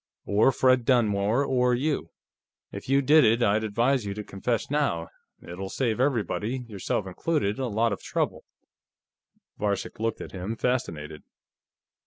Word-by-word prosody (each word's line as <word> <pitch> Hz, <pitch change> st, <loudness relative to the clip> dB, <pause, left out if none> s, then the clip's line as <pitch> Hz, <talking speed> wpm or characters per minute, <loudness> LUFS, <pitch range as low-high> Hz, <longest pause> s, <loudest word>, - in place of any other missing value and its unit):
"Or 105 Hz, +6 st, +4 dB
Fred 130 Hz, -1 st, +3 dB
Dunmore, 115 Hz, 0 st, +2 dB
or 125 Hz, -2 st, +2 dB
you. 145 Hz, +3 st, -1 dB, 0.6 s
If -, -, -8 dB
you 140 Hz, +1 st, +3 dB
did 150 Hz, +3 st, +6 dB
it, 115 Hz, +2 st, +3 dB
I'd 110 Hz, 0 st, +2 dB
advise 120 Hz, +4 st, +1 dB
you 100 Hz, -1 st, -4 dB
to 105 Hz, -, -5 dB
confess 110 Hz, +5 st, -3 dB
now; 140 Hz, -, 0 dB, 0.3 s
it'll 95 Hz, +3 st, -6 dB
save 115 Hz, +1 st, -1 dB
everybody, 120 Hz, -1 st, -1 dB
yourself 100 Hz, -1 st, -2 dB
included, 105 Hz, -, -1 dB
a 130 Hz, -, -1 dB
lot 115 Hz, 0 st, +1 dB
of -, -, -6 dB
trouble." -, -, -2 dB, 1.2 s
Varcek 100 Hz, -1 st, -2 dB
looked 115 Hz, 0 st, -1 dB
at -, -, -8 dB
him, 95 Hz, +4 st, -4 dB
fascinated. 80 Hz, -13 st, -2 dB
115 Hz, 145 wpm, -26 LUFS, 100-130 Hz, 1.2 s, did